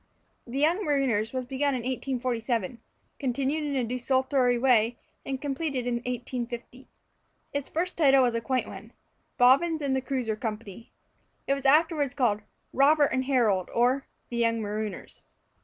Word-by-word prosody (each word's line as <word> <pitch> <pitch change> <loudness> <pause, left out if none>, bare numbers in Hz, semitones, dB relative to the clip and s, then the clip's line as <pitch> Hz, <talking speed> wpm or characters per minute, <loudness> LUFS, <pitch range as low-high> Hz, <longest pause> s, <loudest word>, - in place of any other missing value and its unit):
"The 245 +3 -5
Young 330 +8 +2
Marooners" 260 - +1
was 255 -1 -3
begun 275 +2 0
in 250 - -3
1847, 240 -3 -2 0.4
continued 275 +3 -1
in 285 -1 -2
a 260 - +1
desultory 255 +1 +1
way, 235 -2 +3 0.3
and 270 -1 -4
completed 275 -2 -2
in 245 -1 0
1850. 245 +1 -5 0.7
Its 285 -1 -3
first 355 +3 -2
title 275 -4 +5
was 245 -2 +2
a 230 - -1
quaint 255 +2 -1
one, - - -10 0.4
"Bobbins 280 +7 +4
and 280 -3 -1
Cruisers 245 -6 -2
Company." 220 -1 -6 0.5
It 275 - +1
was 275 0 -1
afterward 295 -2 +3
called 230 -7 +1 0.3
"Robert 290 +2 +4
and 260 0 0
Harold; 225 -9 +2
or, 250 +3 +2 0.2
the 240 - -4
Young 230 -1 +2
Marooners." 210 -1 -5
255 Hz, 145 wpm, -27 LUFS, 235-275 Hz, 0.7 s, title